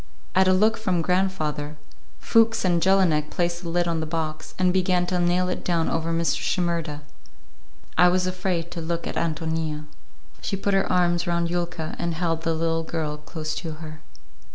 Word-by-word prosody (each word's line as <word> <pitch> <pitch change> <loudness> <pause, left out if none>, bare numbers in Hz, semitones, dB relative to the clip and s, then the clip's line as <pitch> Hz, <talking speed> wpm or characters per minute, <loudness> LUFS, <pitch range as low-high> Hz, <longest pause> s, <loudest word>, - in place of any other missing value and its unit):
At 190 0 +4
a - - +6
look 215 +4 +3
from 185 -6 0
grandfather, 155 -5 -1 0.4
Fuchs 225 -2 +3
and 175 -2 +2
Jelinek 170 -5 +3
placed 175 0 -1
the 170 - -5
lid 175 +1 +1
on 165 -1 0
the 160 - -3
box, 155 -1 -4
and 180 -1 +3
began 180 -1 +2
to 180 0 -1
nail 175 +1 +2
it 180 - -3
down 170 -2 +1
over 165 0 -1
Mr. 165 0 +1
Shimerda. 170 -4 -1 1.0
I 180 - +8
was 180 +1 +2
afraid 180 -2 -2
to 170 - -5
look 170 +1 -3
at - - -3
Ántonia. 160 -2 -2 0.6
She 195 - -2
put 200 +1 0
her 195 0 +2
arms 175 0 +2
round 170 0 0
Yulka 175 -2 -3
and 170 -1 -1
held 165 -1 -1
the 165 0 0
little 165 0 0
girl 160 -2 -3
close 155 +1 -5
to 165 -3 -4
her. 155 0 -9
170 Hz, 180 wpm, -25 LUFS, 160-180 Hz, 1.0 s, I